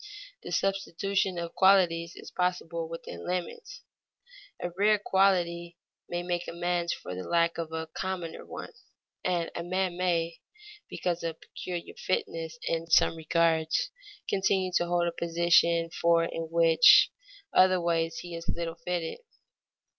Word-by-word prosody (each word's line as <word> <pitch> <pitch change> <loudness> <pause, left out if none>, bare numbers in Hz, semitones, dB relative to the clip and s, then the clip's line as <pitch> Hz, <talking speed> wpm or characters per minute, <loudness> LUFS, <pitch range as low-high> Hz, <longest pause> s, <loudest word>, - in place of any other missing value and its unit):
The - - -8
substitution 195 -1 0
of 170 -1 -4
qualities 175 -3 +3
is - - -11
possible 170 -2 -2
within 125 - -8
limits; 180 - -5 0.8
a 175 - -4
rare 210 +2 +4
quality 175 -4 +1 0.3
may 175 0 -2
make 175 0 -2
amends 175 0 -1
for - - -6
the 90 - -5
lack 170 - +1
of 165 -1 -4
a 160 0 -3
commoner 175 0 -5
one, - - -8 0.5
and 175 -2 -1
a - - -4
man 180 0 -1
may, 170 -2 0 0.5
because 175 -1 -2
of 165 -1 -4
peculiar 175 -2 -7
fitness 165 -3 -3
in 165 0 -2
some 165 - +4
regards, 160 - +1 0.4
continue 190 -1 +1
to 175 - 0
hold 175 0 +1
a - - 0
position 170 0 +2
for 170 -1 +2
which 165 +5 +5 0.4
in - - +3
other 185 0 +6
ways 165 -1 0
he 175 -1 -9
is 165 0 -7
little 170 0 -3
fitted. 175 -2 -3
170 Hz, 140 wpm, -28 LUFS, 165-180 Hz, 0.8 s, other